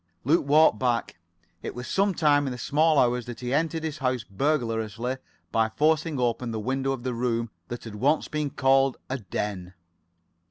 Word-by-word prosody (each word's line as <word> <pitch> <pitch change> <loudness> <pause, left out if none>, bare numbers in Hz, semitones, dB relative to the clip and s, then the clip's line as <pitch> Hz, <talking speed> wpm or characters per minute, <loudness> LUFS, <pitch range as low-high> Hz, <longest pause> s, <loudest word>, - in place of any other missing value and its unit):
Luke 145 +2 +2
walked 150 -6 +5
back. 120 -7 -1 0.4
It - - -6
was 125 0 -6
some 195 -1 +1
time 145 -3 +3
in - - -2
the 125 - -5
small 155 +5 +2
hours 125 -2 +2
that 120 +1 -7
he 125 +1 -2
entered 160 +2 0
his 155 -2 -4
house 130 -4 0
burglariously 115 0 -1 0.3
by 110 -1 +2
forcing 155 +4 +1
open 120 0 0
the 110 -1 -3
window 135 +4 -1
of 130 -2 -7
a 125 - -1
room 115 -1 -1 0.2
that 120 +2 -6
had 110 - -8
once 135 +9 +1
been 150 -1 -2
called 135 0 +3
a 130 - -1
den. 95 -3 -4
130 Hz, 185 wpm, -26 LUFS, 115-150 Hz, 0.4 s, walked